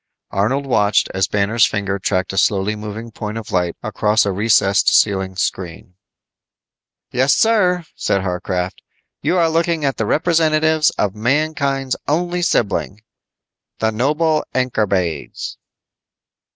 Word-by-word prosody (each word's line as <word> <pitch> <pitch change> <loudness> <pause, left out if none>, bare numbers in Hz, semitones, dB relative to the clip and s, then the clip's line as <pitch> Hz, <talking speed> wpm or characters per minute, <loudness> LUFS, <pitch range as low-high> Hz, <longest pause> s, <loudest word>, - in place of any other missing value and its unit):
Arnold 110 +8 0
watched 105 -6 +2
as 95 0 +1
Banner's 105 +3 +1
finger 100 -1 -2
tracked 95 0 -1
a - - -5
slowly 100 +1 +1
moving 105 +2 -7
point 105 0 -5
of 115 - -7
light 90 -2 0
across 105 +1 +1
a 100 - 0
recessed 100 0 +3
ceiling 95 -2 +2
screen. 90 -1 -4 1.2
"Yes, 130 +3 +3
sir," 185 -6 +2
said 100 -1 0
Warcraft, 90 0 -3 0.4
"you 185 - +1
are 170 -2 +4
looking 165 -1 0
at 135 - 0
the 110 - -1
representatives 155 0 +2
of 100 -2 0
mankind's 135 +3 0
only 175 +4 0
sibling. 105 - -1 0.7
The 110 0 0
noble 150 +7 +1
Ankorbades." 105 -9 -1
110 Hz, 125 wpm, -19 LUFS, 100-155 Hz, 1.2 s, are